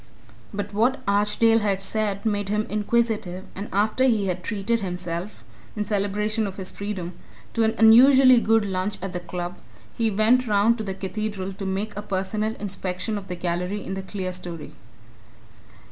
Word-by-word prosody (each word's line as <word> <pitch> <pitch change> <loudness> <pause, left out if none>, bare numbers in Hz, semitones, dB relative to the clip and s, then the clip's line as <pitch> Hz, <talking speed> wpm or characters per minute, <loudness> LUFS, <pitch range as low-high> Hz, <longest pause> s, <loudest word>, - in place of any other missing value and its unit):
But 205 0 -4
what 240 +6 +2
Archdale 210 +3 +3
had 200 -3 0
said 200 0 -2
made 205 -2 0
him 210 +1 0
inquisitive, 210 -3 0
and 200 +2 -6
after 215 +6 +2
he 220 -6 +2
had 180 -1 -2
treated 225 +2 -1
himself 180 +1 -5 0.3
in 210 -1 -2
celebration 210 +1 0
of 190 - -6
his 190 -2 -4
freedom 195 -4 -5 0.4
to 230 - +2
an 220 0 +1
unusually 255 +3 +8
good 225 -1 +3
lunch 190 +1 -2
at 195 0 -5
the 180 - -2
Club, 175 0 -5 0.4
he 225 -1 +1
went 225 +5 +3
round 215 +3 +3
to - - -2
the 195 -2 -4
Cathedral 195 0 -4
to 195 0 -5
make 195 +3 -2
a 205 - -3
personal 210 +2 -2
inspection 190 +1 -3
of 200 -2 -5
the 180 - -4
gallery 180 +3 -2
in - - -4
the 195 - -3
clerestory. 185 -4 -6
205 Hz, 165 wpm, -24 LUFS, 190-220 Hz, 0.4 s, unusually